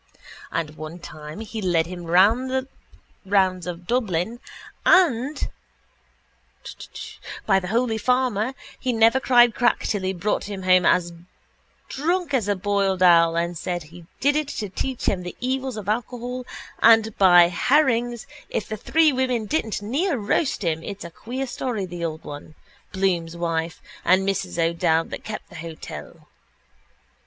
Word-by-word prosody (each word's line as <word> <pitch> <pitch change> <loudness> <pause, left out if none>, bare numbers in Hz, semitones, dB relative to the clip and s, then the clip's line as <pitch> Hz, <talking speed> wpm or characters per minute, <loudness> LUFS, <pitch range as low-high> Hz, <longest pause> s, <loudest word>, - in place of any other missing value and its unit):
And 155 -2 -3
one 155 +2 -7
time 155 +2 -9
he 220 0 -6
led 175 -4 +2
him 175 0 -8
the 245 +9 +3 0.6
rounds 190 -2 +1
of 175 0 -6
Dublin 220 -1 -1 0.4
and, 290 -6 +3 2.0
by 195 -2 +4
the 180 - -6
holy 225 +2 0
farmer, 250 0 +1 0.2
he 255 -2 -1
never 225 +3 +4
cried 240 -3 +5
crack 240 +2 +2
till 205 - -1
he 185 0 -1
brought 190 +3 -1
him 200 -2 -6
home 185 -1 +4
as 175 -1 +2 0.7
drunk 335 +1 -1
as 235 -7 +1
a 205 - +1
boiled 195 -1 0
owl 170 -2 +6
and 170 +1 0
he - - -9
said 175 +1 -3
he 165 +2 -14
did 285 +2 +3
it 305 -2 0
to 210 -7 -4
teach 255 +6 -4
him 185 - +1
the 180 0 -8
evils 260 -1 -2
of 205 -3 -7
alcohol 245 +3 -3 0.3
and 225 -1 +5
by 175 -3 +7
herrings, 240 - +1 0.2
if 220 - -3
the 215 - -4
three 315 +6 +3
women 255 -3 0
didn't 220 -6 -2
near 285 - 0
roast 220 +3 0
him, 160 -2 0
it's 200 +2 -7
a 170 - -8
queer 250 +9 -5
story, 240 -5 -3
the 175 -1 -7
old 160 -1 -4
one, 145 +2 -9 0.4
Bloom's 175 -3 -1
wife 165 -1 -2 0.2
and 190 +1 +3
Mrs 195 -3 -2
O'Dowd 165 -1 +1
that - - -6
kept 215 - -7
the 180 - -11
hotel. 160 -1 -9
205 Hz, 155 wpm, -23 LUFS, 175-245 Hz, 2.0 s, by